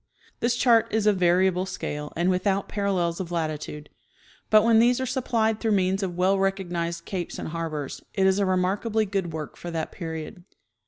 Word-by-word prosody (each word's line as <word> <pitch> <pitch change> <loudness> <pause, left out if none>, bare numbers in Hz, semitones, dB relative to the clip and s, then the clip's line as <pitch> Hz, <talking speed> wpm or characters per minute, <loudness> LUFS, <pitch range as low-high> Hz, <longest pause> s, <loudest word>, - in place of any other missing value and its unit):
This 235 0 +1
chart 235 -2 +4
is 220 -1 +1
of 210 -2 +4
vari 180 +1 +4
able 185 0 0
scale 150 -5 -5
and 175 +3 +2
without 190 +1 0
parallels 185 -5 -1
of 180 -2 -5
latitude, 155 -2 -3 0.6
but 215 -1 +6
when 230 -1 +5
these 245 +2 +4
are 260 - -1
supplied 230 -4 0
through 225 -2 +1
means 190 0 +1
of 180 -3 -3
well 190 +2 +3
recognized 175 -3 -2
capes 180 -3 -4
and - - -5
harbors, 155 -4 -4
it 195 - +2
is 190 +1 +3
a 200 - +2
remarkably 200 +4 +1
good 190 -4 -2
work 155 -2 -6
for 175 - -7
that 165 -2 -3
period. 160 0 -6
185 Hz, 190 wpm, -25 LUFS, 170-210 Hz, 0.6 s, but